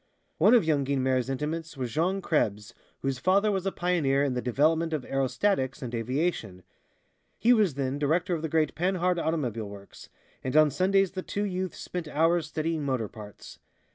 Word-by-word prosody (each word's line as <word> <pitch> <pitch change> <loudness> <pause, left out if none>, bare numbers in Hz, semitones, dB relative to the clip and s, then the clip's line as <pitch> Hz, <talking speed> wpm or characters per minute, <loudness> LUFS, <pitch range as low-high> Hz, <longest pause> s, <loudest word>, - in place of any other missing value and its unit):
One 210 +9 +6
of 230 - +4
young 150 -3 +2
Guynemer's 130 -2 0
intimates 150 +3 -4
was 125 -3 -3
Jean 180 +8 0
Krebs, 105 -11 0 0.3
whose 135 -2 -1
father 200 +7 +3
was 195 -1 -1
a - - +1
pioneer 155 -7 +1
in 140 -2 0
the 125 - -2
development 160 +7 +1
of 150 -5 -2
aerostatics 135 +1 0
and 120 -1 -6
aviation. 115 - -2 0.7
He 240 +2 +4
was 205 - +2
then 135 0 -2
director 165 +5 +1
of 165 - -2
the 160 - -3
great 155 -1 +1
Panhard 180 0 0
automobile 125 -11 -2
works, 100 -1 -12 0.3
and 130 - -3
on 155 -1 +6
Sundays 190 +5 +2
the 190 - -4
two 205 +2 -3
youths 185 -2 -3
spent 175 -3 -5
hours 165 +2 +1
studying 155 0 -2
motor 130 -6 -1
parts. 105 -2 -12
155 Hz, 175 wpm, -27 LUFS, 130-180 Hz, 0.7 s, One